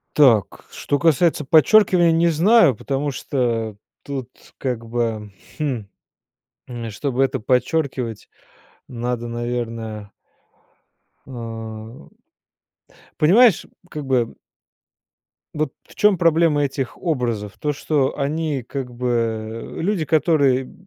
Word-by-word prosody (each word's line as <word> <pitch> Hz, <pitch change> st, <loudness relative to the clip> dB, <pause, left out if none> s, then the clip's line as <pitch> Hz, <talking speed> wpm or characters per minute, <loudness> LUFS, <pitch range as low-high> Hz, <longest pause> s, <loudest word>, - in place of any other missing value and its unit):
Так, 120 Hz, -9 st, +3 dB
что 145 Hz, -, -2 dB
касается 165 Hz, -1 st, +2 dB
подчеркивания, 175 Hz, +2 st, +5 dB
не 165 Hz, +1 st, +3 dB
знаю, 170 Hz, -, +5 dB
потому 140 Hz, +5 st, -2 dB
что 115 Hz, -5 st, -2 dB, 0.3 s
тут 135 Hz, -4 st, -5 dB, 0.3 s
как 125 Hz, -4 st, -3 dB
бы, 115 Hz, -3 st, -2 dB, 0.3 s
хм, 135 Hz, -8 st, -2 dB, 0.8 s
м, 120 Hz, -3 st, -6 dB
чтобы 130 Hz, +4 st, -1 dB
это 135 Hz, 0 st, -1 dB
подчеркивать, 125 Hz, -1 st, -1 dB, 0.6 s
надо, 120 Hz, -1 st, -4 dB
наверное 115 Hz, -3 st, -4 dB, 1.1 s
эм, 115 Hz, 0 st, -8 dB, 1.1 s
понимаешь, 195 Hz, +6 st, +5 dB, 0.2 s
как 150 Hz, -1 st, -6 dB
бы 125 Hz, -3 st, 0 dB, 1.2 s
Вот 155 Hz, 0 st, -2 dB
в -, -, -19 dB
чём 210 Hz, -2 st, +4 dB
проблема 165 Hz, -3 st, +3 dB
этих 135 Hz, -2 st, -3 dB
образов? 120 Hz, -, -2 dB
То, 150 Hz, 0 st, -1 dB
что 145 Hz, -1 st, 0 dB
они 150 Hz, -1 st, -1 dB
как 125 Hz, 0 st, -6 dB
бы 115 Hz, -2 st, -3 dB
люди, 180 Hz, -2 st, 0 dB
которые 140 Hz, -4 st, +2 dB
130 Hz, 100 wpm, -21 LUFS, 115-155 Hz, 1.2 s, подчеркивания